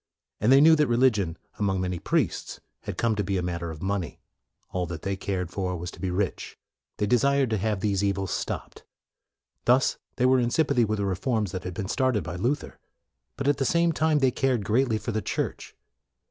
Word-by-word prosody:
And 110 +5 +3
they 135 +1 +8
knew 160 +1 +8
that 150 -1 +3
religion, 115 -8 +2 0.2
among 95 -2 +1
many 90 -1 -2
priests, - - -1 0.3
had - - -5
come 115 -1 +2
to 105 - -1
be 95 0 -1
a 90 - -1
matter 85 -1 -3
of 80 0 -8
money; 95 -3 -2 0.5
all 90 -1 -2
that 80 -2 -6
they 100 0 -1
cared 95 -2 -3
for 90 -2 -2
was 90 +1 -5
to - - -14
be 95 - -2
rich. 95 +2 -2 0.4
They 105 - +1
desired 135 +3 +2
to 110 - +2
have 105 -1 -1
these 100 -1 +1
evils 95 -1 -1
stopped. - - -4 0.8
Thus 125 +2 +3 0.2
they 125 - +1
were 130 0 +5
in 120 -1 +1
sympathy 140 -3 +2
with 110 0 -1
the 100 - -1
reforms 105 +1 -1
which 95 -1 -5
had 90 -1 -5
been 100 -2 -3
started 130 -1 +1
by 90 - -5
Luther. 125 +10 -2 0.6
But, 140 - -2
at 145 -1 +3
the 135 - 0
same 170 +5 +3
time, 155 -1 +2
they 135 -3 +3
cared 125 -5 0
greatly 115 +1 +2
for 115 - -4
the 110 0 -1
Church. - - -4
105 Hz, 210 wpm, -26 LUFS, 95-130 Hz, 0.8 s, they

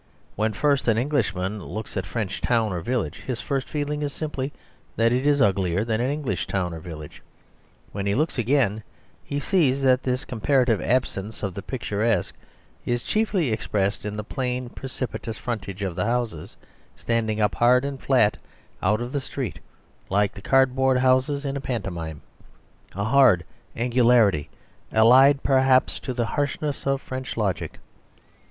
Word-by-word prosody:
When 110 +2 +1
first 140 +5 +1
an 110 -2 +3
Englishman 105 -7 -1
looks 110 +2 -6
at 95 - -2
a - - -13
French 100 -5 -3
town 115 -5 +1
or 85 - -3
village 115 - -2
his 125 -3 -2
first 135 -3 -2
feeling 150 0 -2
is 145 -1 -2
simply 145 -2 -4 0.4
that 115 +1 +3
it 130 +3 +1
is 145 -1 +3
uglier 95 -1 +1
than 115 0 0
an 125 - +1
English 135 - -2
town 90 -3 -1
or 80 - -6
village; 80 -3 -9 0.7
when 100 0 -3
he 100 - +1
looks 155 -2 0
again 120 -3 +2 0.4
he 145 - -3
sees 140 -5 +2
that 130 -1 +4
this 130 +2 -2
comparative 125 -2 +1
absence 110 -4 -1
of 100 -2 -2
the 100 - -6
picturesque 115 -5 -1 0.5
is 120 0 -1
chiefly 205 - +1
expressed 105 -2 -1
in 105 0 -4
the 105 - -3
plain, 125 +2 -3
precipitous 125 -4 -5
frontage 100 -4 -4
of 95 -4 -3
the 90 - -1
houses 115 -9 -2 0.4
standing 110 -2 -1
up 105 -1 +2
hard 125 +2 +4
and 140 -2 -5
flat 125 -6 +3 0.4
out 105 +4 +2
of 120 +1 -4
the 140 - -1
street 130 -2 -5 0.5
like 100 +1 +2
the - - -10
cardboard 130 +1 +3
houses 130 +3 +2
in 140 0 -2
a 140 - -3
pantomime 85 - -4 0.7
a 100 - -1
hard 115 -6 +5 0.3
angularity 120 - +3 0.4
allied 130 +5 +6
perhaps 130 -1 +3
to - - -5
the 120 -2 -1
harshness 145 +2 -2
of 135 0 +2
French 130 -2 -6
logic. 100 -6 -2
120 Hz, 160 wpm, -24 LUFS, 105-135 Hz, 0.7 s, allied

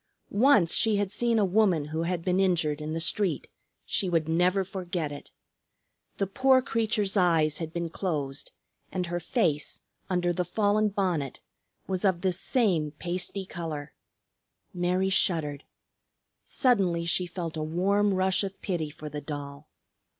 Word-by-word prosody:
Once 210 - +4
she 220 -2 +3
had 200 -1 0
seen 235 +1 +1
a 210 - +4
woman 185 -5 +3
who 155 +2 -3
had 170 0 -2
been 185 0 +2
injured 165 -6 +1
in 155 +1 -4
the 165 - -1
street, 170 -2 0 0.4
she 190 - 0
would 165 -3 +1
never 180 +4 +2
forget 180 -5 -3
it. 145 - -9 0.9
The 195 - +1
poor 260 +7 +4
creature's 220 -4 0
eyes 165 -5 +3
had 160 -2 -4
been 170 -1 -3
closed, 145 -7 -3 0.4
and 185 -1 -1
her 175 0 -2
face, 165 - 0 0.3
under 175 -1 +1
the 180 - 0
fallen 210 +3 +2
bonnet, 180 -9 -1 0.5
was 185 -1 -2
of 190 -4 +2
this 185 -1 0
same 185 - +1
pasty 180 +4 -3
color. 155 -5 -6 0.8
Mary 180 +2 +1
shuddered. 150 -6 0 0.8
Suddenly 190 -10 +2
she 180 +2 +1
felt 170 -2 -5
a 155 - -3
warm 195 +6 +1
rush 190 +1 +2
of 195 0 -5
pity 170 -6 -2
for 150 +1 -9
the 150 0 -5
doll. 145 -1 -7
180 Hz, 150 wpm, -28 LUFS, 160-195 Hz, 0.9 s, Once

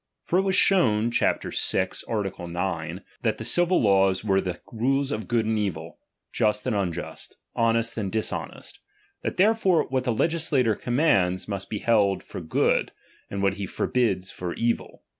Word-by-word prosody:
For 180 - +1
it - - +4
was 190 -1 0
shown 120 - +3
(chap. - - +1
vi. - - +1 0.2
art. 105 -4 -2
9) 85 0 -4 0.2
that 110 -2 0
the 110 - -6
civil 175 +8 +3
laws 95 -2 +3
were 95 -2 +2
the 90 -2 -4
rules 135 +4 0
of 110 0 -3
good 115 -2 +1
and 110 0 0
evil, 85 -5 -4 0.3
just 105 -1 +1
and 125 -4 0
unjust, 85 -4 -4 0.2
honest 115 0 +1
and 100 -3 -3
dishonest; 110 -1 -4 0.4
that - - -4
therefore 190 -5 +3
what 130 -1 0
the 125 - +1
legislator 145 -3 +1
commands, 100 - +1
must 100 -2 -5
be 105 - -3
held 105 -3 +2
for - - -8
good, 80 - +1 0.4
and 100 0 -3
what 100 +1 +1
he 100 -1 -4
forbids 95 -4 0
for 90 -1 -5
evil. 115 0 -2
110 Hz, 165 wpm, -25 LUFS, 95-125 Hz, 0.4 s, it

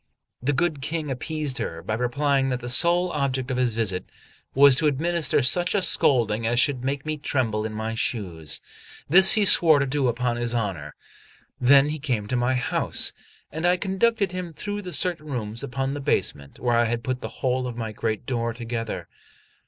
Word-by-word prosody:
The 130 +4 0
good 155 -1 -1
King 155 0 -3
appeased 150 +1 -3
her 80 0 -5
by 110 - -3
replying 135 +3 0
that 125 -1 -2
the 120 0 -6
sole 175 +7 +3
object 135 -3 -2
of 125 - -2
his 125 -3 0
visit 95 -5 -1 0.5
was 140 0 +7
to 155 - +2
administer 160 +1 +1
such 175 +9 +1
a 200 - +2
scolding 115 -8 +2
as 120 +1 +1
should 130 -1 +1
make 135 +1 -2
me 155 0 -2
tremble 115 -7 -1
in 110 - -8
my 110 +1 -3
shoes. 85 -9 -3 0.5
This 190 +5 +8
he 210 -2 +3
swore 160 -5 +6
to 140 - +1
do 135 0 0
upon 120 0 -1
his 120 0 -2
honour. 95 -10 -3 0.6
Then 140 +3 +5
he 155 +1 -4
came 125 -7 -2
to - - 0
my 120 +1 +1
house, 125 - -1 0.4
and 160 +3 -5
I 180 +1 +3
conducted 200 +1 0
him 180 -2 -6
through 205 +5 -5
certain 170 -1 0
rooms 115 -5 -4
upon 135 +2 -3
the 145 - -5
basement, 75 - -2
where 120 -1 +1
I 120 - +3
had 115 +1 -2
put 130 +1 -3
the - - -5 0.2
whole 125 0 0
of 120 -1 -7
my 110 -2 -4
great 110 +1 -3
door 115 -2 -2
together. 115 -1 -5
130 Hz, 190 wpm, -24 LUFS, 115-150 Hz, 0.6 s, This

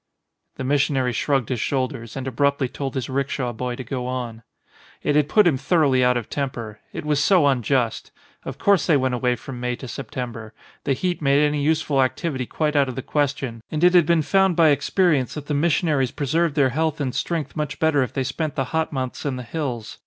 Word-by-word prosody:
The - - -5
missionary 135 -2 +1
shrugged 135 +1 0
his 125 - -1
shoulders 130 -3 -2
and 130 - -4
abruptly 140 +1 +1
told 135 +2 -5
his 130 - -2
rickshaw 135 -2 -2
boy 125 +2 -3
to 130 - -6
go 125 0 -4
on. 120 -3 -4 0.6
It 145 - +1
had 150 -1 +3
put 210 +3 +5
him 160 -6 +3
thoroughly 140 -4 +2
out 125 0 +3
of 120 - -4
temper. 120 -7 -4
It - - -6
was 150 -1 +1
so 175 0 +4
unjust. 125 -3 +1 0.3
Of - - -6
course 200 -4 +3
they 160 -5 +5
went 130 -1 0
away 125 0 +1
from 125 +2 -8
May 125 0 -2
to 130 - -9
September. 115 -3 -6 0.3
The 135 - +2
heat 175 +7 -2
made 140 +1 +4
any 150 0 0
useful 150 -2 +1
activity 130 -1 -1
quite 155 -1 -1
out 140 -2 +3
of 125 - -6
the 130 - -4
question 140 -6 -1
and 155 +1 -2
it 180 0 +6
had 175 -4 +5
been 170 -2 +3
found 190 +1 +3
by 160 -1 +5
experience 145 -1 +2
that 150 -2 -6
the 150 - -3
missionaries 145 -3 +2
pre 145 - -4
served 160 +2 +1
their 140 -4 +4
health 155 +3 -1
and 130 -4 -2
strength 165 -4 -3
much 150 -3 -3
better 160 -3 +2
if 130 - -1
they 135 - -1
spent 155 +4 -3
the 135 - 0
hot 160 0 0
months 130 -3 -4
in 140 -3 -2
the 125 - -6
hills. 125 -3 -5
140 Hz, 220 wpm, -23 LUFS, 125-150 Hz, 0.6 s, it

